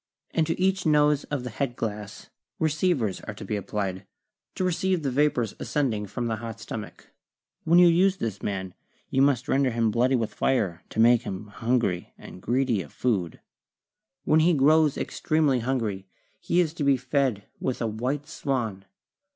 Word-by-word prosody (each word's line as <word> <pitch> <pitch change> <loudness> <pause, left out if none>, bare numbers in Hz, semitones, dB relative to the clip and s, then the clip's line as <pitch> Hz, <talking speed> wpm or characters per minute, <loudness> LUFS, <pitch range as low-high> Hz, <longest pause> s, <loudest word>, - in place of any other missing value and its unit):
And 160 -2 +1
to 165 - -2
each 190 0 +1
nose 150 -2 +3
of 145 -4 -3
the 125 - -5
head 120 +1 -2
glass 105 -3 -6 0.3
receivers 155 - 0
are - - -7
to - - -8
be 105 - -2
applied, 95 -2 -3 0.5
to - - -2
receive 185 -1 0
the 135 - 0
vapors 125 -5 +1
ascend 140 -5 0
ing 105 -1 -4
from 120 +5 -4
the 115 -1 -1
hot 115 0 -7
stomach. 110 -1 -8 0.5
When 170 +2 +5
you 180 - +8
use 185 +3 +4
this 110 - -4
man 95 -2 -3 0.4
you 135 - +2
must 135 -1 +2
render 135 -2 +2
him 115 -2 +1
bloody 125 +4 +2
with 115 -3 -1
fire 100 -10 0
to - - -5
make 120 +1 +6
him 100 -4 -6
hungry 105 -3 -1
and 90 - -12
greedy 120 -2 +1
of - - -11
food. 100 -10 -1 0.8
When 155 - +4
he 165 +1 +4
grows 150 +1 +4
extremely 155 -5 +1
hungry 115 -6 -2 0.3
he 175 - +2
is 160 -3 -1
to 165 - -4
be 140 -1 +4
fed 130 -4 0 0.2
with 130 - -2
a - - -1
white 125 +7 -2
swan. 115 -10 -3
125 Hz, 175 wpm, -26 LUFS, 110-150 Hz, 0.8 s, you